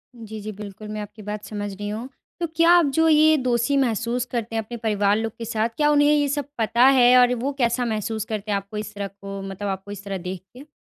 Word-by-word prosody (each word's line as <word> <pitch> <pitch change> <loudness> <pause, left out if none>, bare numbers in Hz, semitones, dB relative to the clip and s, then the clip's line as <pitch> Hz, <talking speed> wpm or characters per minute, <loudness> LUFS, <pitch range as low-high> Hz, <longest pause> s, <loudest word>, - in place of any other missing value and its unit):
जी, 220 -2 -8
जी, 215 +1 -5
बिल्कुल, 210 0 -9
मैं 215 0 -5
आपकी 210 +1 -10
बात 210 0 -5
समझ 205 -2 -5
रही 205 +1 -5
हूँ। 220 +4 -5 0.3
तो 340 - -1
क्या 335 +1 +5
आप 350 -2 +6
जो 325 0 +4
ये 310 0 +6
दोषी 250 +1 +1
महसूस 240 -1 0
करते 230 -2 -3
हैं 225 - +1
अपने 235 +3 -7
परिवार 210 -2 +1
लोग 225 -1 -2
के 230 - -6
साथ, 225 0 -1
क्या 295 -1 +3
उन्हें 290 0 +4
ये 290 -1 +2
सब 285 0 -2
पता 235 +2 +3
है? 250 -2 +6
और 250 0 +5
वो 255 +4 -2
कैसा 245 -1 +1
महसूस 220 -1 -2
करते 215 -1 -4
हैं 200 - +2
आपको 200 +2 -7
इस 210 0 -5
तरह 200 -1 -3
को 195 0 -8
मतलब 195 +1 -5
आपको 195 +1 -5
इस 200 -1 -8
तरह 195 -1 -4
देख 180 0 -6
के? 270 +5 -13
220 Hz, 250 wpm, -23 LUFS, 205-250 Hz, 0.3 s, आप